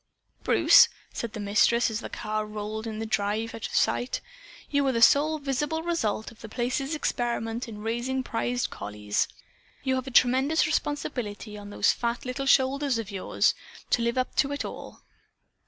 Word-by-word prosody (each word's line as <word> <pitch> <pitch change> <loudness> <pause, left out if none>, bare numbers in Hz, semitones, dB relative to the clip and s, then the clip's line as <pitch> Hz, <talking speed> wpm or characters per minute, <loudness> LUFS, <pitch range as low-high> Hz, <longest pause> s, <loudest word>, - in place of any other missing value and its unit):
"Bruce," - - +7 0.2
said 235 -2 -4
the - - -6
Mistress 215 +4 +3
as 220 - -2
the - - -7
car 215 0 -3
rolled 215 +1 -5
up 220 -1 -5
the 225 - -3
drive 220 +1 -1
and - - -6
out - - -2
of - - -7
sight, 245 - +1 0.5
"you 285 -1 +1
are - - +3
the 230 - 0
sole 295 +6 +5
visible 295 +3 -2
result 230 -11 -1
of 225 - -18
The 225 - -8
Place's 260 +6 -1
experiment 240 -4 -2
in 210 -2 -8
raising 240 +4 -1
prize 245 +1 -1
collies. 105 0 -2 0.6
You 265 -1 +1
have 260 0 -2
a - - -2
tremendous 265 +5 +4
responsibility 245 -9 -3
on 205 -1 -9
those 205 - +3
fat 235 +1 -3
little 260 +2 -3
shoulders 270 0 +3
of 220 -2 -5
yours, 195 -2 +1 0.4
to 240 - +3
live 235 +2 0
up 255 - 0
to 275 - +3
it 285 - -3
all." - - -9
240 Hz, 180 wpm, -27 LUFS, 215-270 Hz, 0.6 s, Bruce